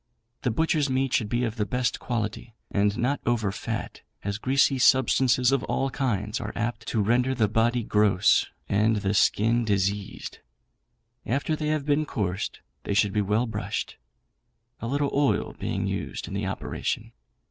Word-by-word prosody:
The 125 - 0
butchers' 150 +3 +1
meat 130 0 0
should 115 -6 +1
be 120 +2 0
of 115 -1 -2
the 105 - 0
best 125 -1 -1
quality, 115 -1 -4 0.2
and 100 +1 +1
not 130 +4 0
over 110 -4 +1
fat, - - -5 0.2
as 100 +1 -3
greasy 135 +2 +2
substances 130 0 +4
of 135 -2 +1
all 135 0 -1
kinds 110 -5 -1
are 105 -2 -4
apt 115 -1 -3
to 110 -3 +1
render 125 +5 +2
the 110 -3 +2
body 115 +2 +1
gross 105 -2 +3 0.2
and 105 +3 +2
the 100 -1 0
skin 115 +3 +3
diseased. 100 -1 -2 0.8
After 140 +5 0
they 155 0 -3
have 155 -2 0
been 150 +1 +1
coursed 95 -5 -3 0.2
they 100 - -2
should 100 -1 +3
be 105 - +2
well 105 +4 +1
brushed, 105 -2 -4 0.8
a 115 - -4
little 140 +2 0
oil 140 0 +1
being - - -2
used - - -4
in - - -7
the - - -2
operation. - - -3
115 Hz, 165 wpm, -26 LUFS, 105-130 Hz, 0.8 s, substances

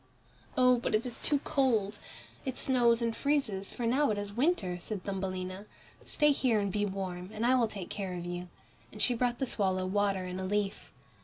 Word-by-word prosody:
"Oh! 250 -1 +5
but 235 - 0
it 215 - 0
is 245 -2 -5
too 295 - +3
cold, 225 -8 +1 0.4
it 260 -2 -4
snows 240 -3 +3
and 230 -1 0
freezes, 255 -10 0
for 240 - -3
now 270 +5 +3
it 210 - 0
is 205 0 -4
winter," 225 - +1
said 195 +1 -5
Thumbelina. 190 0 -4 0.4
"Stay 295 -1 +4
here 250 -6 +2
and 200 -1 -1
be 205 +1 0
warm, 185 -2 -4
and 220 +2 -2
I 250 - +5
will 245 -3 +4
take 200 -4 -7
care 190 -3 -3
of 175 -1 -5
you," 175 0 -4 0.4
and - - -10
she 250 - +4
brought 240 0 0
the 270 - 0
swallow 190 -6 0
water 195 -1 +1
in 180 +1 -5
a - - -3
leaf. 200 +1 -2
210 Hz, 205 wpm, -31 LUFS, 190-245 Hz, 0.4 s, Oh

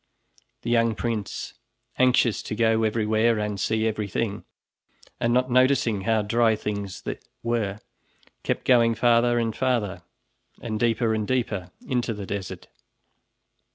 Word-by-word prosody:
The 120 - -2
young 115 -1 +3
prince 110 -5 -3 0.5
anxious 125 -3 +3
to - - -5
go 115 0 +2
everywhere 110 +1 +2
and 105 -1 -2
see 110 +3 0
everything 105 -1 -2 0.7
and 120 - +1
not 125 +1 +2
noticing 125 -5 +3
how 110 +1 +1
dry 115 +1 +3
things 100 -2 -5 0.4
were, 110 -4 -1 0.6
kept - - -2
going 115 -2 +4
farther 120 +1 +3
and 115 -2 0
farther, 120 -7 0 0.6
and 110 -2 -4
deeper 115 0 +2
and 110 -1 -1
deeper, 110 -8 -1 0.2
into 120 -3 -1
the 100 -1 -6
desert. 95 -2 -5
115 Hz, 125 wpm, -25 LUFS, 105-120 Hz, 0.7 s, going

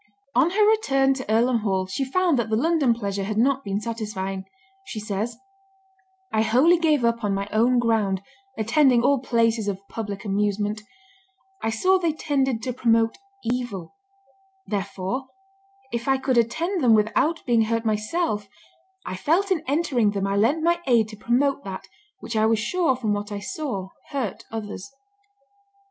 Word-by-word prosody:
On 330 - +4
her 415 +3 +3
return 275 -12 +3
to 260 -5 -5
Earlham 235 +2 +3
Hall 190 -3 0
she 195 +9 -3
found 330 +1 +1
that 225 -2 -1
the 220 - +1
London 300 +1 +2
pleasure 200 -3 -3
had 210 +2 -3
not 270 +4 +2
been 200 0 -2
satisfying. 210 -4 -4 0.4
She 230 - -6
says, 215 +2 -3 1.0
"I 220 - +3
wholly 260 +11 +4
gave 305 -7 +2
up 235 0 0
on 200 -1 +1
my 200 0 -3
own 235 +4 +3
ground, 215 -5 +1 0.3
attending 240 +2 +3
all 280 +1 +3
places 230 -3 +1
of 200 0 -4
public 205 -2 -5
amusement; 205 +1 -1 0.8
I - - 0
saw 370 +13 +3
they 335 -3 0
tended 270 -6 -1
to 255 - -2
promote 230 -2 +2 0.2
evil; 235 -7 -3 0.7
therefore, 200 +5 -3 0.7
if 235 +1 -3
I 270 0 +3
could 265 -1 0
attend 325 - 0
them 230 -3 +6
without 225 +10 +1
being 230 -3 +3
hurt 230 +1 -1
myself, 215 - -1 0.6
I 185 - -4
felt 345 - +1
in 330 -5 +1
entering 275 -7 +2
them 200 -1 -1
I 195 0 0
lent 255 +11 +2
my 345 +1 +2
aid 230 -4 +3
to 215 - -9
promote 265 +6 +1
that 190 0 -6 0.4
which 230 - -6
I 215 0 +3
was 225 0 +3
sure 320 +5 +1
from 225 -5 -1
what 205 0 -4
I 205 - -3
saw 200 -4 -4 0.2
hurt 265 -9 -3
others." 215 0 -6
230 Hz, 165 wpm, -24 LUFS, 210-270 Hz, 1.0 s, them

